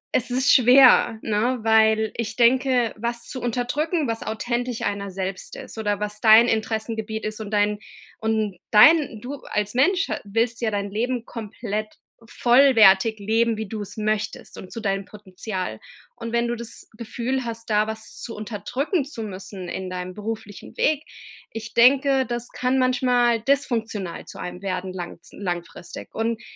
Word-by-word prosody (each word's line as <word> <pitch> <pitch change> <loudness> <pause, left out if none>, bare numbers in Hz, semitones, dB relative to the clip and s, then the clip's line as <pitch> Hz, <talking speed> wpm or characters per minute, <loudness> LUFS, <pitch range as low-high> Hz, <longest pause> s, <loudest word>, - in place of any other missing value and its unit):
es 250 0 +1
ist 260 +2 +3
schwer, 250 -2 +6
ne, 225 +4 0
weil 220 -1 +3
ich 230 -3 -3
denke, 250 0 +3
was 235 +1 -3
zu 255 - -5
unterdrücken, 275 +6 -1
was 225 0 -2
authentisch 240 +2 -3
einer 200 -1 -2
selbst 190 0 -5
ist - - -9
oder 205 -1 -1
was 210 0 -4
dein 225 +1 +7
Interessengebiet 220 0 -2
ist 215 +1 -4
und 210 - -6
dein 205 0 +1 0.4
und 220 -4 -1
dein 255 -1 +6
du 280 +3 -6
als 210 +1 -1
Mensch, 365 +9 +2
äh, - - -2
willst 230 +3 -1
ja 225 - +1
dein 200 -1 -3
Leben 240 +3 -2
komplett 215 -1 -5 0.4
vollwertig 225 -5 +5
leben, 225 +2 +1
wie 220 -2 -4
du 215 +1 -5
es 205 +1 -8
möchtest 215 0 -3
und 185 - -10
zu 230 - -6
deinem 195 -1 -1
Potenzial. 190 - -6 0.4
Und 230 -1 -6
wenn 235 0 +1
du 240 - -1
das 230 -1 -6
Gefühl 245 +3 -3
hast, 230 0 -6
da 210 0 +3
was 220 0 -6
zu 230 - -6
unterdrücken 245 - -2
zu 235 -6 -7
müssen 190 -2 -7
in 190 +1 -5
deinem 180 0 -5
beruflichen 210 -1 -7
Weg. 310 0 +1 0.5
Ich 225 0 -7
denke, 265 +2 +4
das 240 0 -4
kann 255 +1 0
manchmal 245 -2 +2
dysfunktional 225 -8 -1
zu - - -10
einem 180 +1 -6
werden 185 -1 -3
langz 175 -1 -8
langfristig. 175 -2 -6
Und 225 +1 -1
225 Hz, 160 wpm, -23 LUFS, 210-245 Hz, 0.5 s, dein